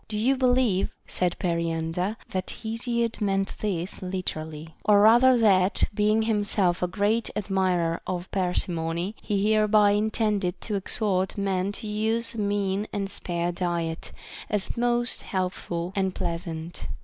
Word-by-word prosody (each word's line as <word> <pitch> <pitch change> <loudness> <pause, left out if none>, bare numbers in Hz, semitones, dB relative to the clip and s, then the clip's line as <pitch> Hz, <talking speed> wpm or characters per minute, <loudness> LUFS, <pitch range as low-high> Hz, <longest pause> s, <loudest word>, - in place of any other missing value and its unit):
* - - -35
Do 215 - -4
you 250 +6 +3
believe, 250 -7 +2 0.2
said 180 -1 -1
Periander, 170 +2 -1
that 185 0 -2
Hesiod 230 +1 -1
meant 195 -1 0
this 185 -4 -3
literally; 160 -4 -4
or 205 -1 +5
rather 240 +4 +6
that, 195 -4 +3
being 215 +1 +2
himself 205 -4 +1
a 180 - +2
great 210 +5 0
admirer 185 -4 0
of 180 0 -3
parsimony, 175 0 -1
he 205 0 +1
hereby 215 -1 +4
in 210 +2 +2
tended 210 -5 0
to 215 - -4
exhort 195 -1 0
men 195 -1 0
to 220 - -7
use 225 +2 +1
a 230 - -6
mean 205 0 0
and 200 -1 -3
spare 175 -2 -2
diet, 170 -2 -3 0.4
as 205 -2 -1
most 240 0 +1
healthful 180 -2 -3
and 190 -2 0
pleasant? 170 -1 -4
195 Hz, 140 wpm, -26 LUFS, 180-215 Hz, 0.4 s, rather